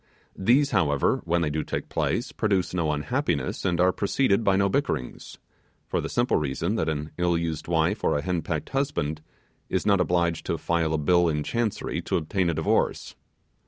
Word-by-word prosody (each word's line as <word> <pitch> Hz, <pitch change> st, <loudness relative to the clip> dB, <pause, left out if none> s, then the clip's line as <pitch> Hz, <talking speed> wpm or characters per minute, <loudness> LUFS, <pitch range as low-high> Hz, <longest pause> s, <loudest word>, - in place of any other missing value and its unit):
These, 130 Hz, +9 st, +3 dB
however, 75 Hz, -8 st, +2 dB
when 85 Hz, 0 st, +1 dB
they 75 Hz, -3 st, 0 dB
do 75 Hz, +1 st, -1 dB
take -, -, -4 dB
place, -, -, -1 dB
produce 95 Hz, -5 st, 0 dB
no 85 Hz, -4 st, 0 dB
unhappiness, 75 Hz, -, -1 dB
and 90 Hz, -2 st, 0 dB
are 90 Hz, +1 st, +5 dB
preceded 100 Hz, +2 st, +1 dB
by 100 Hz, -2 st, +3 dB
no 100 Hz, +1 st, +3 dB
bickerings; 100 Hz, -, -3 dB, 0.5 s
for -, -, -1 dB
the -, -, -4 dB
simple 120 Hz, +1 st, +1 dB
reason, 75 Hz, +6 st, -1 dB
that 80 Hz, -8 st, 0 dB
an 75 Hz, 0 st, -3 dB
ill 90 Hz, -1 st, +2 dB
used 80 Hz, -2 st, -3 dB
wife 85 Hz, +5 st, +1 dB
or -, -, +2 dB
a 70 Hz, -, -3 dB
henpecked 85 Hz, -3 st, -2 dB
husband 135 Hz, -, -1 dB, 0.5 s
is -, -, -1 dB
not 100 Hz, -3 st, +4 dB
obliged 85 Hz, -2 st, 0 dB
to -, -, 0 dB
file 80 Hz, -2 st, 0 dB
a -, -, +1 dB
bill 85 Hz, +3 st, +3 dB
in 75 Hz, -1 st, -1 dB
Chancery 115 Hz, +4 st, -2 dB
to -, -, -1 dB
obtain 85 Hz, +3 st, 0 dB
a 85 Hz, -, -1 dB
divorce. 80 Hz, -, 0 dB
85 Hz, 185 wpm, -26 LUFS, 80-100 Hz, 0.5 s, are